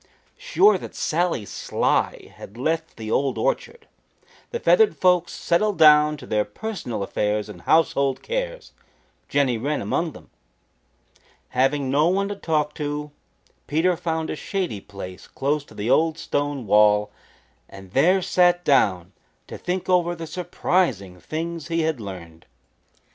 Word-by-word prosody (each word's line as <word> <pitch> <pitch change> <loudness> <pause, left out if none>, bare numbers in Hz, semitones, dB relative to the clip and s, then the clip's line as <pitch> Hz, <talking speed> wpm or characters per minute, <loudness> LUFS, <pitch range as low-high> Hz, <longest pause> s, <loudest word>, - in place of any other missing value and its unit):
Sure 455 -4 +4
that - - -9
Sally 165 -9 0
Sly - - -1
had 105 - -12
left 160 +5 -2
the 110 -1 -6
Old 135 +3 +1
Orchard, 470 -1 -2 0.6
the 475 - -4
feathered 445 -3 +4
folks 180 -2 +3
settled 200 +4 0
down 150 -1 +6
to - - -11
their 105 -1 +1
personal 120 - -5
affairs 105 +1 -1
and 105 - -11
household 140 -4 +2
cares, - - -4 0.6
Jenny 130 -5 +1
Wren 145 +5 -1
among 165 -3 -2
them. - - -15 1.2
Having 135 +1 +1
no 150 +3 +3
one 195 +3 +1
to 205 - -3
talk 155 -5 -1
to, 150 0 -4 0.6
Peter 165 +4 +2
found 160 -1 -3
a - - -3
shady 175 - -3
place 95 -2 -10
close 145 +2 -1
to - - -17
the 110 +4 -1
old 160 0 +3
stone 145 -5 -2
wall 105 0 +4 0.6
and 95 -1 -12
there 180 - +3
sat 175 0 +3
down 95 - +2 0.3
to - - -9
think 180 +1 -3
over 175 -2 +2
the 165 -1 -7
surprising 160 - -1
things 165 - -5
he 165 -1 0
had 160 -6 -1
learned. 85 -5 -9
150 Hz, 145 wpm, -23 LUFS, 115-175 Hz, 1.2 s, down